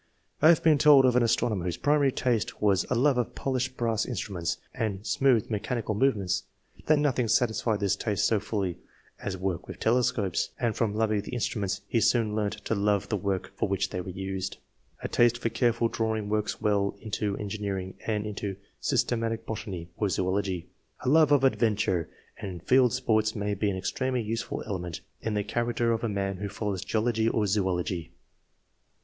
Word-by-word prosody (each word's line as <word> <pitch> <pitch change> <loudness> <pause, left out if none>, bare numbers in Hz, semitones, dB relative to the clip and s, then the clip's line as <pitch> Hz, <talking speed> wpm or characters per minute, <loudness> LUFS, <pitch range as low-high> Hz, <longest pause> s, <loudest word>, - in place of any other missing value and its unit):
I - - +7
have 165 -1 +6
been 155 -3 +5
told 145 -3 +7
of 125 -1 +3
an 125 - +5
astronomer 115 -4 +1
whose 90 - -2
primary 145 -2 +3
taste 120 -4 -1
was 100 -3 +2
a - - +1
love 130 +1 +3
of 120 - -2
polished 130 -1 -2
brass 115 -2 +1
instruments 95 -9 -3 0.2
and 105 -2 -3
smooth 125 -5 +2
mechanical 110 +1 -2
movements, 105 -5 +1 0.4
that 155 - +5
nothing 135 -5 +1
sat 115 +2 +3
isfied 110 0 -1
this 100 -2 +2
taste 105 -3 0
so 110 - +3
fully 100 -4 -3 0.4
as 95 -1 -4
work 95 -1 -3
with - - -8
telescopes, 110 -6 +1
and 115 -3 0
from 110 -3 0
loving 110 -1 +1
the 105 - -9
instruments 100 -4 -2
he 115 - +1
soon 115 -1 +2
learnt 105 -1 -2
to - - 0
love 100 -1 +1
the 110 - +1
work 95 -1 -2
for - - -1
which 95 0 0
they 90 - -3
were 95 - -7
used. 95 +1 -4 0.5
A - - -1
taste 120 0 +3
for 120 -1 -1
careful 120 -1 +2
drawing 110 -2 -2
works 105 0 -1
well 100 -1 +1
into 105 -1 -2
en 105 - -4
gineering 95 -3 -3
and 105 -1 0
into 100 -1 -4 0.2
systematic 115 -1 0
botany 95 -6 -5
or 105 - 0
zoology. 95 -1 -1 0.4
A - - 0
love 155 0 +5
of 145 -2 +5
adventure 105 -9 +1 0.3
and 95 -5 -6
field 125 -2 +4
sports 110 -4 +1
may 105 -1 -1
be 100 +1 0
an 95 - -2
extremely 125 +7 -1
useful 110 +1 -3
element 90 -4 -4 0.2
in 110 -1 -2
the 105 - 0
character 120 +2 0
of 115 0 -1
a 115 - 0
man 100 -1 -2
who 100 +1 -4
follows 100 -2 -3
geology 110 +1 +1
or 110 -2 +1
zoology. 90 -4 -1
110 Hz, 185 wpm, -28 LUFS, 100-120 Hz, 0.5 s, I